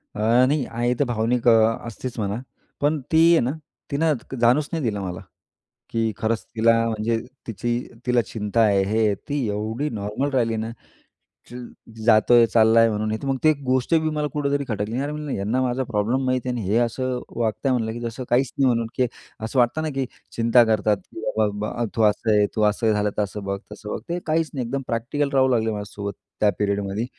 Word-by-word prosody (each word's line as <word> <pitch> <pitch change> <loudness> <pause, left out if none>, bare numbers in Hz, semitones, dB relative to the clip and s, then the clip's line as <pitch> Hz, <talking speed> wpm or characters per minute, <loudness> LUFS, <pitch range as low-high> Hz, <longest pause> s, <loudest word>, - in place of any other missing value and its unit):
अ, - - -6 0.3
नाही. 145 -1 +1
आई 120 +2 -1
तर - - +4
भावनिक 120 0 0
अ, - - +8 0.4
असतेच 120 +2 -6
म्हणा. 105 +1 -2 0.4
पण 150 +1 +2
ती 160 - +4
आहे 165 - +6
ना, 125 - 0 0.4
तिनं 155 +2 +2 0.3
जाणूच 125 +5 +3
नाही 165 -3 -2
दिलं 105 -4 -1
मला. 90 -3 -5 0.7
की 115 -1 0
खरंच 110 0 -1
तिला 115 +1 +4 0.2
म्हणजे 110 +1 0 0.3
तिची 120 +1 -3 0.4
तिला 125 -1 +3
चिंता 105 +1 -1
आहे 100 -3 +4
हे, 110 +1 +2
ती 140 +5 -3
एवढी 110 +8 -2
नॉर्मल 105 +5 -2
राहिली 115 -4 +1
ना, 110 +1 -3 0.8
चिल, 125 0 -8 0.4
जातोय, 115 +1 +6
चालला 115 0 +4
आहे 115 0 +5
म्हणून, 110 0 -1
हे 110 - -1
तर 140 - -5
मग 135 -1 0
ती 155 - +6
गोष्ट 130 +4 +1
बी 160 -1 +2
मला 150 0 0
कुठेतरी 145 -1 0
खटकली. 110 +1 -2
"अरे! 140 +2 -2
म्हणलं 150 -2 -5
यांना 110 +6 -1
माझा 130 +1 0
प्रॉब्लेम 120 +3 0
माहीत 130 0 +1
आहे 125 - -1
आणि 120 - -3
हे 105 +4 +2
असं 125 +2 0 0.2
वागत 115 +2 -2
आहे 135 - +3
म्हणलं, 115 -3 -1
की 115 - -6
जसं 120 +2 -5
काहीच 125 +1 +2
नाही." 135 - +3
म्हणून 115 -2 +1
की 125 - +2 0.3
असं 110 +4 -1
वाटतं 120 +6 +2
ना 155 - -2
की 135 -1 0 0.3
चिंता 115 +1 +5
करतात, 110 -1 +2
की 110 - -12 0.2
बाबा 110 - +3 0.4
ब - - +1
"तू 115 - +1
असं 105 +1 +2
आहे, 105 -1 +4
तू 110 - +1
असं 110 +2 0
झालं 105 0 +1
तर 105 0 -2
बघ, 100 -1 -3
तसं 105 0 -9
बघ." - - -3
ते 175 +1 -1
काहीच 160 0 +1
नाही 130 -4 -2
एकदम 135 +3 -2
प्रॅक्टिकल 120 +5 -1
राहू 130 -1 +4
लागले 115 -3 +1
माझ्यासोबत. 100 -1 -5 0.3
त्या 105 - +4
पिरियडमध्ये, 100 +1 -1
115 Hz, 205 wpm, -23 LUFS, 110-130 Hz, 0.8 s, अ